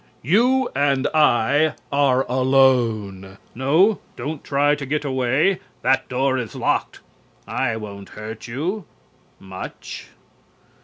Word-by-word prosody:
You 245 - +3
and 140 -1 +1
I 150 +1 +3 0.2
are 135 -2 +2
alone. 120 -7 +1 0.2
No, 160 - +3 0.2
don't 145 +4 -5
try 145 +1 +2
to 145 -1 -3
get 150 +2 -1
away. 135 +8 +1 0.2
That 135 0 +2
door 130 +1 +1
is 115 -5 -6
locked. - - -1 0.5
I 115 - -1
won't 100 -2 -9
hurt 110 +1 -8
you 165 - -3 0.5
much. 95 -1 -8
135 Hz, 110 wpm, -22 LUFS, 115-150 Hz, 0.5 s, You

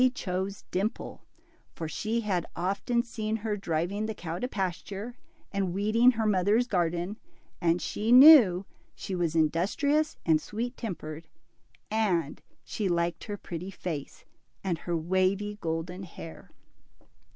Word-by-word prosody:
chose 190 0 -3
Dimple^ 200 +5 -2 0.6
for 165 - -4
she 220 +9 -2
had 190 -6 -1
often 200 +7 0
seen 220 -2 -3
her 215 -1 -2
driving 195 +3 -2
the 220 - -4
cow 170 -2 -5
to 250 - -1
pasture, 200 +2 -4 0.4
and 195 -3 -1
weeding 225 +5 +4
her 225 -1 -1
mother's 210 +4 +3
garden; 175 0 -1 0.4
and 170 0 +2
she 220 +3 -1
knew 245 - +9 0.3
she 195 - -6
was 170 -3 -1
industrious 205 - +1
and 155 -2 +4
sweet 235 +7 -4
tempered, 165 -7 -6 0.6
and 185 -9 0 0.2
she 205 -3 -2
liked 170 0 -1
her 205 -1 -5
pretty 175 0 -6
f^ce, 160 -7 -6 0.4
and 175 -4 -1
her 170 0 -2
wavy 190 +5 0
golden 165 +3 -3
hair. 165 -3 -10
190 Hz, 130 wpm, -28 LUFS, 170-215 Hz, 0.6 s, knew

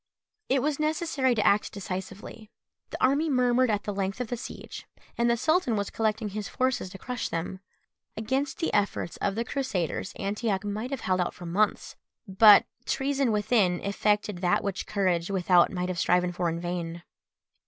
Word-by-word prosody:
It 265 -1 +2
was 295 0 0
necessary 305 -5 +1
to 215 - 0
act 205 +1 +3
decisively; 195 +3 -7 0.4
the - - -5
army 285 +5 +2
murmured 250 -1 +3
at 210 -1 0
the 205 - -3
length 195 +2 -2
of 250 -3 -3
the 245 - -1
siege, 240 - -9 0.3
and 235 0 +2
the 235 - +2
sultan 315 -2 +2
was 200 -1 -2
collecting 220 -1 -1
his 205 0 -5
forces 255 -7 -1
to 195 - -10
crush 250 +4 -4
them. 165 +3 -4 0.6
Against 265 +6 -1
the 330 - -2
efforts 200 -4 0
of 200 - -1
the 230 +1 -2
Crusaders 220 - -2
Antioch 200 0 -2
might 210 +4 -3
have 270 -4 -4
held 185 -1 +1
out 180 - -2
for 175 - -10
months; 200 +5 0 0.3
but 200 +2 +7 0.2
treason 270 -2 0
within 210 -4 +2
effected 205 0 0
that 175 -1 +1
which 195 -1 -3
courage 185 -4 0
without 180 -2 +3
might 180 -1 -2
have 180 -2 -3
striven 180 +1 +2
for 175 -1 -1
in 165 0 -3
vain. 170 -1 -4
210 Hz, 175 wpm, -27 LUFS, 185-250 Hz, 0.6 s, but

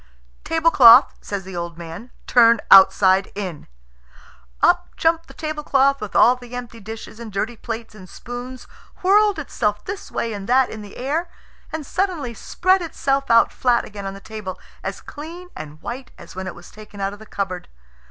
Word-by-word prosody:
"Tablecloth," 285 -7 +6
says 200 -1 -5
the 190 0 -9
old 170 -1 -5
man, 170 +8 -9 0.2
"turn 235 -2 +5
outside 190 0 +6
in." 185 -7 -6 1.0
Up - - +3
jumped 330 0 +1
the - - -14
tablecloth 280 -3 +1
with 210 - -6
all 245 - +6
the 245 -1 -11
empty 245 -2 -7
dishes 220 +1 -9
and 230 -2 -8
dirty 215 +4 -2
plates 225 0 -6
and 190 -4 -13
spoons, 245 +4 -8 0.4
whirled 410 +1 +4
itself 210 -8 -2
this 400 +1 -6
way 230 - -2
and 200 0 -7
that 260 +1 +3
in 215 - -7
the 205 -1 -11
air, 310 +7 -2 0.4
and 315 -2 -5
suddenly 345 -8 -2
spread 370 - +1
itself 275 -4 -1
out 230 0 +5
flat 245 -2 +1
again 200 -1 -7
on 195 - -6
the - - -10
table, 200 -3 -7 0.2
as - - -5
clean 335 +5 -10
and 155 0 -10
white 255 +2 -6
as - - -13
when 190 0 -5
it 185 - -6
was 175 - -14
taken 210 -1 -13
out 195 0 -2
of 205 - -12
the 220 - -13
cupboard. 185 -3 -4
230 Hz, 180 wpm, -21 LUFS, 200-275 Hz, 1.0 s, Tablecloth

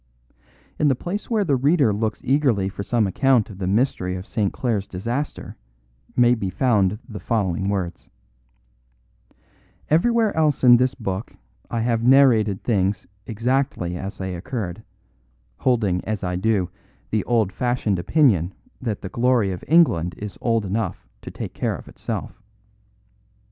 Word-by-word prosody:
In 150 - +3
the 135 - +3
place 180 - -5
where 220 -3 +2
the 145 -7 +2
reader 140 -3 +3
looks 110 +1 -2
eagerly 130 -8 +2
for 100 - -7
some 115 +2 +1
account 120 +2 +2
of 95 - -11
the 90 - -2
mystery 95 -3 0
of 90 +1 -6
St. 105 -4 -1
Clare's 115 -7 -2
disaster 120 +10 -4 0.6
may 120 0 +5
be 100 -6 -2
found 105 -2 +2
the 105 -5 -7
following 95 -4 -1
words: 95 -4 -3 1.8
'Everywhere 225 +6 +3
else 155 -4 +1
in 120 -1 +8
this 130 +1 +1
book 100 -3 -5 0.3
I 115 - -1
have 115 -1 +1
narrated 115 -6 +4
things 100 -4 0 0.2
exactly 115 -5 -1
as 95 +3 -6
they 95 -1 -4
occurred, 95 +1 -5 0.8
holding 105 -8 +1
as 110 -2 -3
I 90 -1 -1
do 95 -2 0 0.4
the 110 -3 +1
old 115 -5 +1
fashioned 120 -5 0
opinion 95 - +2 0.3
that 110 -5 -3
the 95 - -6
glory 120 -2 +2
of 90 - -6
England 90 - +3
is 105 -1 -7
old 115 -3 +1
enough 100 - -3
to - - -8
take - - -7
care - - -1
of - - -11
itself. 105 - -6
110 Hz, 150 wpm, -22 LUFS, 95-130 Hz, 1.8 s, in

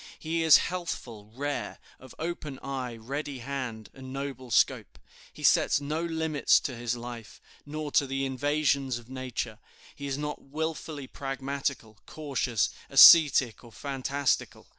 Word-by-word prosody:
He 165 +1 -2
is 160 -2 +8
healthful, 120 - -5
rare, 145 +4 -4 0.2
of 130 -1 -14
open 160 -4 -5
eye, 130 -3 -4
ready 135 +5 -5
hand, 125 -4 -5
and 130 -1 -10
noble 135 -2 -6
scope. 110 - +1 0.3
He - - -12
sets - - +4
no 150 +3 -3
limits 160 -3 +2
to 130 - -4
his 120 0 -2
life, 120 -3 -9 0.3
nor 150 0 -5
to 140 - +3
the 135 +1 -2
invasions 140 -1 0
of 120 +1 -13
nature; 125 -4 -5 0.4
he 140 - -6
is 135 0 -2
not 150 0 -4
willfully 155 0 -5
pragmatical, 135 -5 -4
cautious, 135 -7 -1 0.2
ascetic, 135 -9 +8
or 120 - -14
fantastical. 140 +1 -2
135 Hz, 140 wpm, -28 LUFS, 125-145 Hz, 0.4 s, is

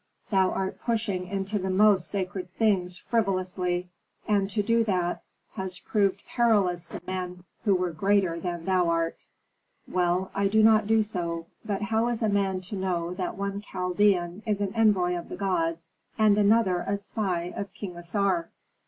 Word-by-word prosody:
"Thou 190 -2 +4
art 190 0 -3
pushing 210 -6 -1
into 195 +2 -2
the 190 0 -2
most 195 -1 +4
sacred 185 -2 -3
things 185 -5 +1
frivolously, 185 -4 -1 0.4
and 200 -2 +2
to 205 +1 0
do 230 +2 +3
that 180 -4 0 0.3
has 190 -3 -4
proved 200 -1 0
perilous 195 -8 +2
to - - -8
men 180 -1 -4 0.2
who 200 -3 +4
were 180 -1 0
greater 190 0 +1
than 175 -1 -4
thou 185 -2 +2
art." 165 0 -1 0.6
"Well, 180 +1 0
I 200 0 +1
will 215 +2 +4
not 215 -1 +5
do 220 0 +4
so. 170 -5 -3 0.2
But 205 -2 -2
how 225 +2 +1
is 240 -1 -1
a 220 - +3
man 195 -2 +1
to 190 +3 -7
know 180 -2 -1
that 180 -1 -4
one 200 0 -3
Chaldean 180 -1 +1
is 210 -2 +1
an 200 -2 -2
envoy 200 -6 +3
of 175 - -6
the - - -6
gods, 165 -4 -1 0.3
and 215 -2 +5
another 205 -3 +3
a 200 - 0
spy 185 -4 -2
of 200 -2 -5
King 185 -4 -6
Assar?" 175 0 0
190 Hz, 170 wpm, -27 LUFS, 180-205 Hz, 0.6 s, not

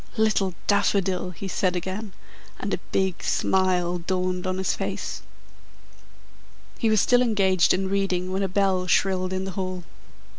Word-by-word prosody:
"Little 210 -4 +2
Daffodil!" 195 -3 +1
he 185 +2 -7
said 185 0 0
again, 190 +3 -4 0.4
and - - -3
a - - -1
big 190 -2 0
smile 180 -2 +1
dawned 180 +1 -2
on 185 0 -1
his 190 - 0
face. - - -4 1.6
He 225 - +2
was 215 -1 +4
still 245 +4 +4
engaged 195 -6 +3
in 190 +1 +1
reading 190 -2 -1
when 190 +1 -1
a 195 - +1
bell 190 -1 +1
shrilled 185 0 +2
in 190 0 -2
the 190 - -4
hall. 185 -1 -4
190 Hz, 150 wpm, -25 LUFS, 185-195 Hz, 1.6 s, was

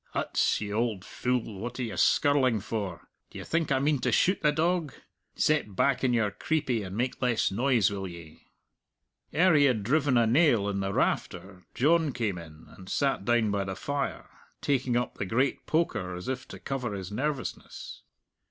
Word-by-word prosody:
"Huts, - - +1
you 105 -1 -4
auld 110 -3 -1
fule, 125 -5 -2
what 120 +5 -5
are - - -1
you 115 - -4
skirling 130 -6 +3
for? 100 -5 -5 0.2
D'ye - - -8
think 165 -3 -1
I 135 - +4
mean 145 +1 +1
to - - 0
shoot 190 +2 +2
the 150 - +4
dog? 160 -2 0 0.4
Set 150 -10 +1
back 135 +5 +2
on 130 - +3
your 110 -4 +1
creepie 130 -3 -1
and 95 0 -6
make 125 +2 -2
less 125 -5 +1
noise, 120 -2 +2
will 95 -1 -4
ye?" 85 -3 -12 0.8
Ere 180 +2 +4
he 145 -2 +5
had 120 -7 +2
driven 140 +2 +2
a 120 - +4
nail 120 -4 +3
in 100 -1 -2
the 95 0 -1
rafter 95 -1 -2
John 155 +1 +3
came 105 -7 -2
in, 80 -1 -13
and 95 0 -12
sat 135 -8 0
down 120 -2 +2
by 100 -1 0
the 95 0 -4
fire, 140 +7 -3 0.3
taking 130 -3 0
up 120 - -3
the - - -1
great 130 +7 0
poker, 125 - 0
as 90 - -7
if 130 0 -4
to - - -9
cover 125 -6 -4
his 95 0 -6
nervousness. 140 +4 -4
120 Hz, 185 wpm, -28 LUFS, 100-140 Hz, 0.8 s, he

